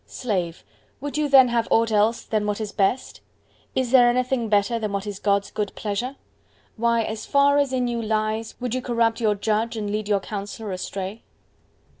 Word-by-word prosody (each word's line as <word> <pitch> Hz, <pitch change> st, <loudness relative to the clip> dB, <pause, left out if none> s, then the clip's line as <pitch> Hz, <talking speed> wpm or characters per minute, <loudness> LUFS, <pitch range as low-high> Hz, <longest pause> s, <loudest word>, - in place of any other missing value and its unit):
Slave, 185 Hz, -9 st, -3 dB, 0.4 s
would 285 Hz, +1 st, -5 dB
you 300 Hz, -1 st, 0 dB
then 265 Hz, -2 st, +7 dB
have 235 Hz, -1 st, 0 dB
aught 225 Hz, 0 st, +3 dB
else 215 Hz, +2 st, +2 dB
then 215 Hz, -2 st, -1 dB
what 210 Hz, 0 st, -1 dB
is 215 Hz, -2 st, -4 dB
best? 200 Hz, +6 st, 0 dB, 0.6 s
is 255 Hz, -2 st, 0 dB
there 245 Hz, -2 st, +7 dB
anything 250 Hz, -1 st, 0 dB
better 210 Hz, +3 st, +2 dB
than 215 Hz, -2 st, -3 dB
what 200 Hz, 0 st, -2 dB
is 205 Hz, -2 st, -5 dB
God's 200 Hz, -1 st, +1 dB
good 210 Hz, -2 st, -3 dB
pleasure? 225 Hz, +6 st, -3 dB, 0.6 s
Why, 235 Hz, 0 st, +2 dB
as 220 Hz, 0 st, -5 dB
far 285 Hz, 0 st, +4 dB
as 280 Hz, -2 st, +1 dB
in 250 Hz, -1 st, 0 dB
you 235 Hz, -1 st, -2 dB
lies, 220 Hz, 0 st, -1 dB
would 250 Hz, -2 st, -3 dB
you 255 Hz, -, -1 dB
corrupt 235 Hz, -2 st, 0 dB
your 215 Hz, -2 st, +2 dB
Judge, 220 Hz, +3 st, -1 dB
and 205 Hz, -1 st, -3 dB
lead 210 Hz, 0 st, -2 dB
your 205 Hz, -1 st, +2 dB
Counsellor 205 Hz, +1 st, -6 dB
astray? 190 Hz, +3 st, -5 dB
225 Hz, 190 wpm, -23 LUFS, 205-245 Hz, 0.6 s, then